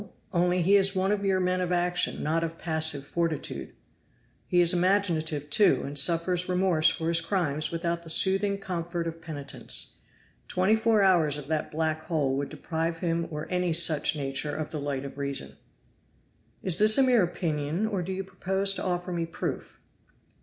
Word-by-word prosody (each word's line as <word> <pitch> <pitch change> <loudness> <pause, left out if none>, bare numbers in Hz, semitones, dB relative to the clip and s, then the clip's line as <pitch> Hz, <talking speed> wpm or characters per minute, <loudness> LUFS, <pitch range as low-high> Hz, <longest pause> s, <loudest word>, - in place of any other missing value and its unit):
only 180 0 +1
he 200 +4 +5
is 195 0 +1
one 190 +1 +1
of 205 -1 -1
your 190 -1 +1
men 185 0 0
of 180 -1 -2
action, 175 0 0
not 165 +2 0
of 165 0 -5
passive 160 -4 0
fortitude. 155 - -4 0.7
He 180 - +2
is 175 +1 +5
imaginative, 175 -5 +1
too, 175 -8 +4
and 140 - -6
suffers 170 +4 +3
remorse 180 -3 +3
for 160 - -3
his 165 0 +2
crimes 160 -5 0
without 170 0 -2
the 165 - -8
soothing 195 +4 +4
comfort 175 -3 -4
of 165 0 -6
penitence. 150 -4 -3 0.5
Twenty 185 +4 +2
four 220 -2 +2
hours 165 -6 +3
of 145 - -8
that 155 -1 -1
black 155 0 -1
hole 150 -5 -1
would 140 0 -3
deprive 165 +2 -3
him 170 -1 -2
or 150 -1 -5
any 180 -2 0
such 160 -2 +3
nature 140 +1 -2
of 155 -1 -5
the 155 - -4
light 140 -1 -4
of 140 0 -9
reason." 140 - -4 1.1
"Is 185 -2 +1
this 215 +1 +6
a 270 - +5
mere 250 -4 +4
opinion 165 0 -2
or 205 -4 -2
do 180 +2 -5
you 190 +1 -3
propose 190 +1 -1
to - - -5
offer 180 0 -2
me 170 -1 -2
proof?" 165 - -6
170 Hz, 180 wpm, -27 LUFS, 155-185 Hz, 1.1 s, this